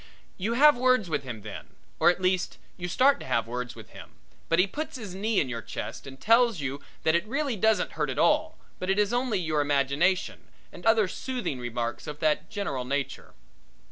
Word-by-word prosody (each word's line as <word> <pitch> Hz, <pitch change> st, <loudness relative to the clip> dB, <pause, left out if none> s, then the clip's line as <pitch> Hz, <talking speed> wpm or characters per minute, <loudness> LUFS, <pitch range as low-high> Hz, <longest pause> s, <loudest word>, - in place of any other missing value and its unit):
You 210 Hz, +5 st, -2 dB
have 295 Hz, +4 st, +7 dB
words 250 Hz, -7 st, +2 dB
with -, -, 0 dB
him 120 Hz, -6 st, -7 dB
then, 105 Hz, -2 st, -9 dB, 0.2 s
or -, -, +6 dB
at 175 Hz, -, +1 dB
least 185 Hz, 0 st, +1 dB, 0.2 s
you 175 Hz, -1 st, -5 dB
start 265 Hz, +10 st, +4 dB
to -, -, -9 dB
have 115 Hz, -1 st, +1 dB
words 125 Hz, +1 st, -5 dB
with -, -, -12 dB
him, -, -, -12 dB, 0.4 s
but 165 Hz, -, +3 dB
he 180 Hz, -, +5 dB
puts 295 Hz, +8 st, -5 dB
his 210 Hz, -7 st, -7 dB
knee 210 Hz, +2 st, 0 dB
in 140 Hz, -, +1 dB
your 120 Hz, -2 st, -4 dB
chest -, -, -6 dB
and 135 Hz, 0 st, -10 dB
tells 230 Hz, -3 st, +4 dB
you 140 Hz, 0 st, -4 dB, 0.2 s
that 160 Hz, -, +3 dB
it 170 Hz, +4 st, +1 dB
really 275 Hz, +1 st, -1 dB
doesn't 215 Hz, -1 st, +2 dB
hurt 150 Hz, -3 st, -2 dB
at 130 Hz, -, -3 dB
all, 310 Hz, -, +2 dB, 0.2 s
but 185 Hz, -, -3 dB
is 205 Hz, +3 st, +2 dB
only 245 Hz, -3 st, +1 dB
your 160 Hz, -4 st, 0 dB
imagination, 145 Hz, +6 st, +1 dB, 0.2 s
and 175 Hz, -, -12 dB
utters -, -, +9 dB
other -, -, -1 dB
soothing 245 Hz, -, -4 dB
remarks 120 Hz, +2 st, -4 dB
of 150 Hz, -1 st, -5 dB
that 155 Hz, -1 st, +1 dB
general 200 Hz, -12 st, -3 dB
nature. 135 Hz, +1 st, -4 dB
180 Hz, 205 wpm, -27 LUFS, 140-225 Hz, 0.4 s, utters